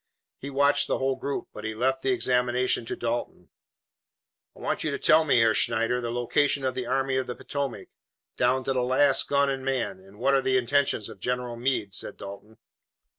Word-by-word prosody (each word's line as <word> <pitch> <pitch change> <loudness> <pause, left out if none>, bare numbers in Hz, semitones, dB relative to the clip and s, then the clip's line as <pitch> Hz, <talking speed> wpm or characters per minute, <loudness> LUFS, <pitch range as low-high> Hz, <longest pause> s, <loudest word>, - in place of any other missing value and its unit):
He 140 - -6
watched 140 +1 +2
the - - 0
whole 135 0 0
group, 140 +1 -4
but 105 - -9
he 110 0 -4
left 130 +3 0
the 135 - -1
examination 125 -1 +1
to - - -3
Dalton. 120 0 -4 1.1
"I - - -16
want - - -2
you - - 0
to - - -2
tell 160 +1 +5
me, 140 -5 +3
Herr 115 -1 +4
Schneider, 115 +2 +1
the 120 - -3
location 135 +4 +1
of 130 - 0
the 125 -1 -4
Army 135 +1 0
of 130 - -1
the 125 - -4
Potomac, 140 -4 -4 0.5
down 130 +1 +2
to 135 - -1
the 130 - +1
last 130 +3 +3
gun 140 0 +3
and 135 -1 -2
man, 130 -8 -2
and 95 +2 -17
what 135 +5 +2
are 135 - +4
the 130 0 +2
intentions 130 -3 +1
of 110 -3 -11
General 125 +2 -2
Meade," 120 -5 -1
said - - -5
Dalton. 100 +3 -10
125 Hz, 205 wpm, -26 LUFS, 120-135 Hz, 1.1 s, tell